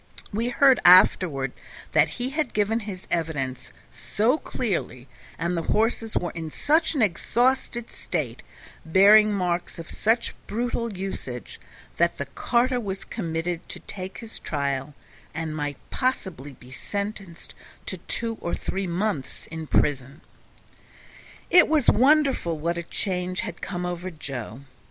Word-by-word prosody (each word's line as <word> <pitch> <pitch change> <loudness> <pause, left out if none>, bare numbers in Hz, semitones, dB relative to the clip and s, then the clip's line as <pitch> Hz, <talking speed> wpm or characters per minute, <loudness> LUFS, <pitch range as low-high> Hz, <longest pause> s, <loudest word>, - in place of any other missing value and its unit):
We 230 +4 0
heard 265 +1 +5
afterward 170 -6 +6 0.4
that - - +4
he 250 +2 -2
had 300 -3 -2
given 215 +2 +2
his 185 -2 -7
evidence 145 -6 -2 0.2
so 240 +9 +1
clearly, 170 - -3 0.3
and 170 +2 -1
the 165 - 0
horses 225 +4 0
were 175 - -1
in 165 -2 -5
such 310 - +2
an 260 - +3
exhausted 240 +5 +1
state, 135 -9 -4 0.4
bearing 205 +6 +6
marks 180 -3 -1
of 165 -1 -8
such 225 +2 +1
brutal 235 +1 -2
usage, 180 - -6 0.4
that 170 0 +2
the 140 - -3
carter 245 - +1
was 195 -4 -5
committed 170 -4 -3
to - - -6
take 190 -1 -7
his 225 -2 -8
trial, 140 -1 -2 0.4
and 160 -1 -3
might 145 -2 -3
possibly 190 - -2
be 125 0 -16
sentenced 200 +2 -5 0.3
to - - -4
two 230 -1 -3
or 170 - -2
three 190 0 -3
months 175 -5 -2
in 160 -1 -6
prison. 140 +1 0 1.3
It 355 -1 +8
was 305 -4 +4
wonderful 265 - +3
what 170 +3 -1
a 170 - -2
change 180 +1 -2
had - - -6
come 180 -2 -3
over 180 +1 -3
Joe. 135 - -7
185 Hz, 135 wpm, -25 LUFS, 160-225 Hz, 1.3 s, It